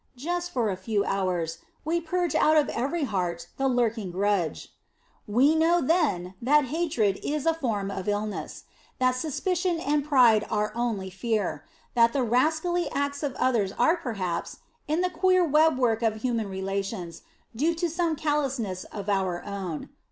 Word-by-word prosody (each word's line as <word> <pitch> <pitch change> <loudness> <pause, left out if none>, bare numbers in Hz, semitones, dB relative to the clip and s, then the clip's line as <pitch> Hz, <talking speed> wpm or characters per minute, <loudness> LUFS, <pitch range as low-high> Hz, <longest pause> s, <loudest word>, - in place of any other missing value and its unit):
Just 350 +6 -2
for 240 - 0
a - - -2
few 205 0 0
hours 180 -4 -1 0.3
we 335 +2 0
"purge 350 0 -1
out 310 0 +4
of 295 -3 +3
every 285 +7 -1
heart 180 -8 -2
the 270 - +1
lurking 230 -5 0
grudge." 190 -2 -1 0.5
We 255 +9 +4
know 325 +2 +3
then 260 - +1
that 290 +4 +4
hatred 290 - +1
is 295 0 -2
a 330 - +4
form 220 -11 -2
of 190 -1 -5
illness; 205 0 -3 0.3
that 255 0 +3
suspicion 335 +6 -1
and 295 -2 0
pride 250 -7 +5
are 210 -1 0
only 220 -5 -2
fear; 200 -6 -2 0.3
that 230 -1 +4
the 275 - +1
rascally 315 +9 +1
acts 285 0 -2
of 285 -4 -2
others 220 -7 +1
are 320 +8 +3
perhaps, 200 - -4 0.3
in 315 +3 +1
the 365 0 0
queer 370 +1 +3
webwork 265 -7 +3
of 220 -1 -1
human 230 -5 -1
relations, 190 -2 -4 0.3
due 315 +8 +1
to 345 +1 0
some 335 0 0
calousness 275 -11 -1
of 200 -1 -8
our 190 -3 0
own. 190 -6 -5
245 Hz, 160 wpm, -26 LUFS, 200-315 Hz, 0.5 s, pride